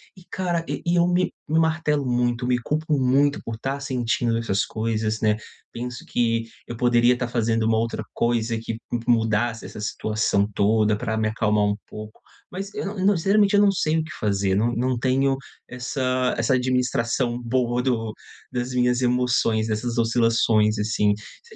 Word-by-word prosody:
E 185 - -16
cara, 175 -3 -1
e - - -4
e 170 +1 +2
eu 170 0 +4
me 180 +1 +1 0.2
me 160 +1 +3
martelo 155 -3 +1
muito, 120 0 0
me 125 -1 +2
culpo 155 +4 -1
muito 140 +3 +2
por 115 -1 -5
tá 135 +4 -3
sentindo 120 -3 0
essas 105 -4 0
coisas, 110 -1 -2
né. 105 -1 +3 0.4
Penso 125 +1 -6
que 115 -1 0 0.2
eu 120 - -6
poderia 120 0 +3
tá 125 - -2
fazendo 115 -1 0
uma 110 0 +2
outra 115 +1 -1
coisa 115 -1 0
que 115 0 -5
mu 120 - 0
mudasse 115 0 +1
essa 105 - -8
situação 105 -1 0
toda 105 +1 +3
pra 110 -2 -2
me 110 -1 +1
acalmar 105 -1 +1
um 105 - +1
pouco. 110 0 -10 0.3
Mas 195 +2 -6
eu - - -3
não 200 0 -5
eu 190 - 0
não 200 -3 +4
sinceramente, 200 +3 +3
eu 205 - +5
não 205 -1 +5
sei 160 -4 0
o - - -1
que 160 - -9
fazer, 100 -2 +1
não 115 +4 +2
não 125 +1 0
tenho 135 +2 +1 0.3
essa 125 0 -1
essa 115 +3 +1
administração 125 -1 0
boa 120 0 0
do 115 -4 -1 0.4
das 125 0 -3
minhas 125 0 +2
emoções, 120 -3 +1
dessas 115 +2 -2
oscilações, 115 -2 +2
assim. 105 -1 +1 0.3
Se 465 -1 -16
120 Hz, 180 wpm, -23 LUFS, 110-130 Hz, 0.4 s, eu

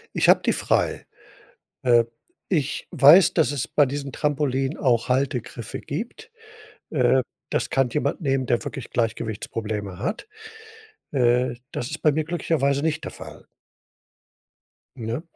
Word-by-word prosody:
Ich - - +2
habe - - +7
die - - +2
frei. - - 0 0.8
Äh, 120 -2 +5 0.4
ich 150 -7 -1
weiß, 155 +6 +7
dass 160 -4 +2
es 140 -4 -2
bei 145 - +3
diesen 140 +1 -4
Trampolinen 145 -1 -1
auch 120 -2 +1
Haltegriffe 125 -3 -2
gibt. 235 - -6 0.6
Äh, 130 -3 +3 0.3
das - - -1
kann 135 -2 +2
jemand 150 +8 -1
nehmen, 135 -3 0
der 120 -1 0
wirklich 135 -5 -6
Gleichgewichtsprobleme 110 -3 -3
hat. 215 - -3 0.9
Äh, 125 -1 +2 0.2
das 120 +4 -4
ist 155 - -6
bei 150 - +4
mir 155 +1 0
glücklicherweise 145 -4 0
nicht 160 0 -1
der - - -5
Fall. - - -11 1.5
Ne? 115 +4 -4
135 Hz, 135 wpm, -24 LUFS, 120-150 Hz, 1.5 s, habe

